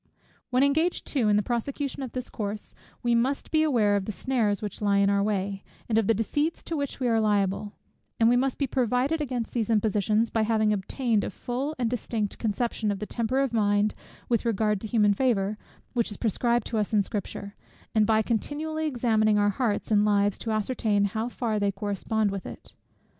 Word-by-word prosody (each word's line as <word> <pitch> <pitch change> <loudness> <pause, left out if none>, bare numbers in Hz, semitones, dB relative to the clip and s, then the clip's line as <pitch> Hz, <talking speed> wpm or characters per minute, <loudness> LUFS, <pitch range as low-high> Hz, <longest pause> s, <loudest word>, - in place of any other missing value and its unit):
When 255 +1 +3
engaged 315 +5 +1
too 245 -7 +1
in 205 - +4
the 210 - +2
prosecution 275 +5 -3
of 260 -3 -5
this 255 -1 -5
course, 210 -1 -5 0.3
we 240 -1 +2
must 255 +4 0
be 315 - +3
aware 230 -10 +3
of 200 -1 -1
the 215 - -3
snares 220 -3 0
which 210 -1 -6
lie 200 -1 +2
in 200 0 +4
our 200 0 +2
way, 200 -1 -1 0.2
and 225 - 0
of 215 - 0
the 225 - +4
deceits 290 +9 -1
to 330 - -4
which 285 -2 -3
we 255 - 0
are 225 -1 +3
liable: 205 -1 0 0.5
and 225 - +5
we 240 - +5
must 260 +1 +1
be 280 - +1
provided 260 +5 0
against 250 -5 -3
these 230 -3 -1
impositions, 215 0 +2
by 225 - +1
having 215 -1 +2
obtained 215 +2 0
a - - -2
full 255 - -4
and 245 -2 0
distinct 225 -3 -3
conception 225 0 -1
of 200 - -1
the 210 - -5
temper 240 +4 0
of 270 -3 -1
mind 205 -1 +2 0.3
with 235 -3 +1
regard 210 -3 +1
to 220 - -5
human 210 -2 +3
favour, 210 -4 +1 0.4
which 235 -3 +1
is 210 - -7
prescribed 235 +1 +1
to 225 - -1
us 210 +1 -2
in 205 - +4
Scripture; 200 0 -5 0.4
and 215 -1 +3
by 220 -1 +3
continually 310 +8 -2
examining 220 -5 +2
our 205 0 +3
hearts 220 -1 -1
and 205 -1 +5
lives 205 -1 +2
to 225 - -4
ascertain 215 -2 +1
how 220 +4 -2
far 225 -3 -2
they 200 -1 +1
correspond 205 +2 -1
with 195 -1 -5
it. - - -11
220 Hz, 205 wpm, -27 LUFS, 205-250 Hz, 0.5 s, and